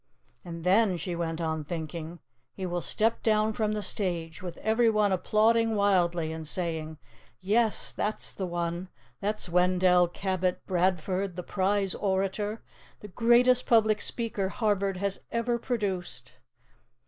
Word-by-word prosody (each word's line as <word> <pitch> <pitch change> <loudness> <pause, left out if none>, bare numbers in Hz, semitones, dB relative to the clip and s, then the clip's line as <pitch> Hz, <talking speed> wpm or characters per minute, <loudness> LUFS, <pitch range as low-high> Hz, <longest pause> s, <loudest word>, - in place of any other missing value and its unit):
"And 170 -2 -7
then," 190 +1 +3
she 170 +2 -4
went 165 -1 -3
on 160 -2 -2
thinking, 160 +1 -6 0.4
"he 190 - -4
will 175 -1 -2
step 225 +6 0
down 215 0 +2
from 215 -2 0
the 210 -1 -3
stage, 170 -5 -3
with 180 -2 -7
everyone 220 -2 +2
applauding 220 +4 +2
wildly 175 -5 +2
and 160 -1 -6
saying, 160 -2 -2 0.4
'Yes, 215 +3 +1
that's 210 +1 -2
the 190 - -4
one. 175 +1 -3 0.3
That's 210 0 -2
Wendell 180 0 +4
Cabot 185 0 -2
Bradford, 185 +1 0
the 180 - -5
prize 195 0 0
orator, 200 +2 -1 0.4
the 210 - -9
greatest 240 +4 +4
public 220 -2 +4
speaker 215 -5 -1
Harvard 200 -3 0
has 200 +1 -1
ever 235 +1 -1
produced. 200 -8 -3
190 Hz, 135 wpm, -28 LUFS, 175-215 Hz, 0.4 s, Wendell